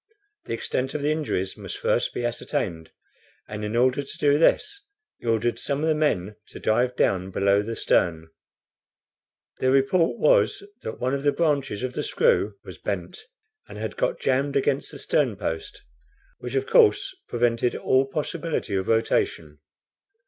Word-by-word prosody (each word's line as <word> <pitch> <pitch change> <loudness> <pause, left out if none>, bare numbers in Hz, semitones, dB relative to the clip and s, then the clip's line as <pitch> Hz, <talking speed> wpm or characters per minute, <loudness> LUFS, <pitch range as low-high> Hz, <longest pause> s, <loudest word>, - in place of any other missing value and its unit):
The - - -4
extent 130 +4 -3
of 145 - -2
the 150 - +2
injuries 145 -12 -2
must - - -7
first - - +1
be 120 - -3
ascertained, 105 - -3 0.6
and 105 0 -6
in 105 +2 -3
order 130 +3 +3
to 140 - -9
do 145 0 +3
this 405 - +2 0.4
he - - -9
ordered 115 +1 +1
some 145 +1 -2
of - - +1
the 160 - +4
men 105 -10 0
to - - -11
dive 125 +3 +1
down 95 -4 +1
below 100 +1 +2
the 115 +2 -4
stern. 80 -6 +1 1.3
Their 130 - +2
report 135 0 +3
was 105 - +3 0.2
that 110 - -6
one 130 +2 0
of 140 - -1
the 145 0 +3
branches 140 -9 0
of 130 -1 -2
the 150 - -2
screw 475 - +2
was - - -10
bent, 440 - -5 0.4
and - - -9
had - - -4
got - - -1
jammed 135 +2 0
against 140 0 +1
the - - -9
stern - - +1
post, 415 -2 -5 0.6
which - - -6
of 405 0 +1
course 435 -5 +4
prevented 120 0 +1
all 130 +1 +2
possibility 150 -4 -3
of 95 -1 -1
rotation. 80 -9 0
130 Hz, 165 wpm, -25 LUFS, 110-150 Hz, 1.3 s, the